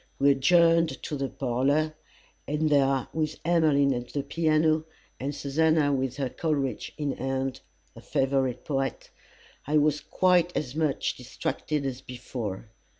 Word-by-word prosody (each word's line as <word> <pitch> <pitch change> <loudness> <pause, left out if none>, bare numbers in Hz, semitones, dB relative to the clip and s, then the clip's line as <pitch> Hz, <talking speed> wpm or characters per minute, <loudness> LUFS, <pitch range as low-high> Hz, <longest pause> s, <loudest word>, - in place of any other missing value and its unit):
We 140 +1 +5
adjourned 165 +4 +3
to 150 - -3
the 135 -1 -2
parlour, 140 +5 0 0.5
and 150 +1 0
there, 135 -3 +3
with 155 -1 -2
Emmeline 155 -5 +3
at 120 0 -5
the 140 - -1
piano, 155 +1 +2 0.4
and 140 +2 -3
Susannah 150 0 +2
with 130 -2 -1
her 135 -2 -1
Coleridge 140 -1 -2
in 145 -2 -1
hand 135 0 -2 0.3
her - - -12
favourite 135 -2 0
poet 135 -3 -2 0.6
I 150 +1 +3
was 150 0 +2
quite 180 +2 +2
as 130 -4 -3
much 155 -2 0
distracted 140 +3 -3
as 130 -1 -4
before. 120 -5 -6
140 Hz, 140 wpm, -27 LUFS, 135-155 Hz, 0.6 s, We